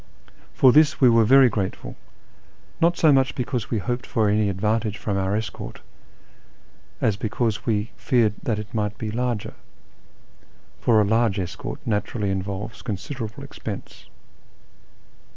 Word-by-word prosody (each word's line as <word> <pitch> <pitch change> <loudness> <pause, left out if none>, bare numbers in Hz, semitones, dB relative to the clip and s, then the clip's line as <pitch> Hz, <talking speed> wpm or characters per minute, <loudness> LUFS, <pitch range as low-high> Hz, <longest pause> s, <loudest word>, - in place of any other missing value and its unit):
For 130 - +6
this 150 +2 +4
we 130 - +6
were 115 -1 +5
very 135 +3 +7
grateful, 100 -4 -3 0.9
not 170 +1 +3
so 155 - +5
much 135 0 +3
because 125 -3 -3
we 115 - 0
hoped 120 +5 -3
for 110 -5 +1
any 105 0 +2
advantage 105 +2 -1
from 105 - -3
our 95 +1 0
escort, 110 0 -5 1.2
as 105 - +1
because 110 +1 -2
we 105 -2 +2
had 115 - -15
feared 115 -5 +2
that 115 -6 -1
it 105 0 -7
mi^rht 105 -2 -2
be 110 -1 -4
larger; 120 -2 -2 1.3
for 110 -2 +4
a 105 - +3
large 110 -1 +2
escort 95 +10 -5
naturally 105 -2 -1
involves 100 +3 -4
considerable 110 +1 -5
ex - - -12
pense. - - -7
110 Hz, 145 wpm, -23 LUFS, 105-125 Hz, 1.3 s, very